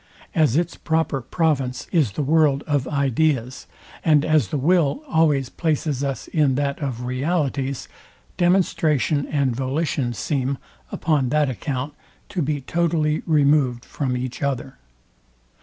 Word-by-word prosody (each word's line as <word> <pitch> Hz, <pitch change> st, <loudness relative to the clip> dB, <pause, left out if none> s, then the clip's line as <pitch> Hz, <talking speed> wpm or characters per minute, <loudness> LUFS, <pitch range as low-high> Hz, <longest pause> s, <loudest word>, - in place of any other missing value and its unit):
As 155 Hz, -, +3 dB
its 175 Hz, 0 st, -1 dB
proper 160 Hz, -4 st, 0 dB
province 135 Hz, -3 st, -1 dB
is 150 Hz, -, +2 dB
the 150 Hz, -, -2 dB
world 150 Hz, -1 st, +3 dB
of 145 Hz, -4 st, 0 dB
ideas, 135 Hz, -2 st, 0 dB, 0.4 s
and 150 Hz, -2 st, +4 dB
as 155 Hz, -8 st, +3 dB
the 145 Hz, -, -2 dB
will 170 Hz, -, +2 dB
always 150 Hz, -, +2 dB
places 150 Hz, -4 st, -1 dB
us 135 Hz, -1 st, -3 dB
in 145 Hz, -5 st, +2 dB
that 140 Hz, 0 st, -1 dB
of 125 Hz, -5 st, -4 dB
realities, 135 Hz, 0 st, -1 dB, 0.5 s
demonstration 160 Hz, -, +2 dB
and 140 Hz, -5 st, 0 dB
volition 135 Hz, -1 st, -1 dB
seem, 135 Hz, +1 st, -1 dB, 0.3 s
upon 150 Hz, -6 st, +1 dB
that 150 Hz, -1 st, +2 dB
account, 135 Hz, +2 st, -4 dB, 0.4 s
to 180 Hz, -, -2 dB
be 145 Hz, -1 st, -1 dB
totally 160 Hz, 0 st, 0 dB
removed, 140 Hz, -5 st, +3 dB
from 130 Hz, -3 st, -2 dB
each 125 Hz, 0 st, -5 dB
other. 135 Hz, -2 st, -3 dB
145 Hz, 130 wpm, -22 LUFS, 130-155 Hz, 0.5 s, and